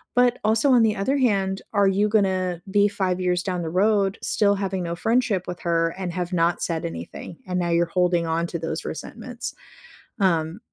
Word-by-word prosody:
But 245 0 +4
also 220 +6 +3
on 245 -3 +6
the 215 -1 +2
other 245 +8 0
hand, 195 -7 +1
are 200 -2 +3
you 200 +2 +2
gonna 185 -4 +1
be 205 +1 +4
5 190 -3 -1
years 180 -1 0
down 180 -2 -2
the 165 - -3
road 200 +2 +2
still 205 -1 +2
having 190 -2 -2
no 170 0 -3
friendship 220 -1 0
with 180 -1 -5
her 165 -1 +1
and 185 -2 -3
have 180 +1 -3
not 170 0 +1
said 165 -2 -2
anything? 85 - -7
And 180 0 -1
now 175 -1 -1
you're 170 0 +3
holding 175 -1 +1
on 165 +1 0
to 170 - -5
those 165 - -4
resentments, - - -6 0.7
um 170 -2 +1
185 Hz, 195 wpm, -24 LUFS, 170-205 Hz, 0.7 s, on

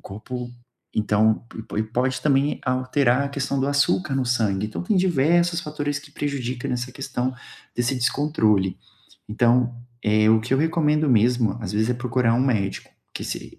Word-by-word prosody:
corpo 120 +5 -7 0.5
então, 110 +1 +2
e - - -5
po - - -9
e - - +2
pode 125 +4 -1
também 140 0 +2
alterar 130 +1 +1
a - - -2
questão 140 0 -2
do 135 - +1
açúcar 145 +2 +1
no 130 -1 0
sangue. 105 -5 0
Então 110 - -5
tem 195 +2 0
diversas 170 0 +2
fatores 145 -2 -3
que 145 - -15
prejudica 130 -4 -3
nessa 125 0 -3
questão 130 -2 -3 0.4
desse 120 +3 0
descontrole. 110 - +1 0.5
Então, 120 +2 +2 0.3
eh, 110 0 +3
o 110 - +6
que 120 +4 -4
eu - - +1
recomendo 155 -1 +2
mesmo, 115 -2 +3
às 100 -2 -5
vezes, 110 +2 +1
é - - +1
procurar 120 -1 +1
um 130 +2 +2
médico, 100 -7 -1 0.2
que - - -6
se - - -7
125 Hz, 170 wpm, -23 LUFS, 110-140 Hz, 0.5 s, o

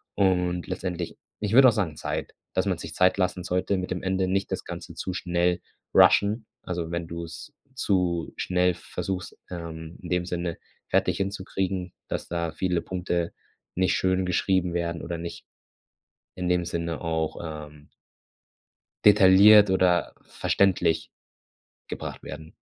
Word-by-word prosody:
Und 90 -2 +1
letztendlich 90 -2 -4 0.3
ich 105 0 -1
würde 130 +1 +9
auch - - +3
sagen, 95 -8 -1
Zeit, - - -4 0.2
dass - - +1
man - - +1
sich - - -7
Zeit 95 +1 +3
lassen 90 -1 0
sollte 90 +3 0
mit 90 0 -3
dem 90 - -3
Ende, 95 0 +1
nicht 95 +2 -1
das - - -2
Ganze - - -8
zu 95 - -4
schnell 90 0 +1 0.4
rushen. 105 +3 +5 0.2
Also, 85 -2 -4
wenn 85 -1 -3
du's 85 - -7 0.2
zu 90 - 0
schnell 90 -1 +1
versuchst, 90 +1 -5
ähm, 85 -1 -7
in 90 - -7
dem 90 -1 +1
Sinne 85 -1 -3 0.3
fertig - - +2
hinzukriegen, 95 -2 -2 0.2
dass - - -3
da 85 -1 -2
viele 90 0 0
Punkte 90 -2 -2 0.4
nicht 95 0 +2
schön 95 0 +1
geschrieben 90 0 +1
werden 85 -1 -2
oder 85 0 -4
nicht 85 +1 -7 0.9
in 90 -1 -3
dem 90 -1 +2
Sinne 85 -1 -3
auch, 80 -1 -1 0.3
ähm 75 0 -19 1.1
detailliert 100 +1 +8
oder 90 -2 +2
verständlich 90 -4 +1 0.8
gebracht - - -6
werden. 80 +2 -9
90 Hz, 145 wpm, -26 LUFS, 85-95 Hz, 1.1 s, würde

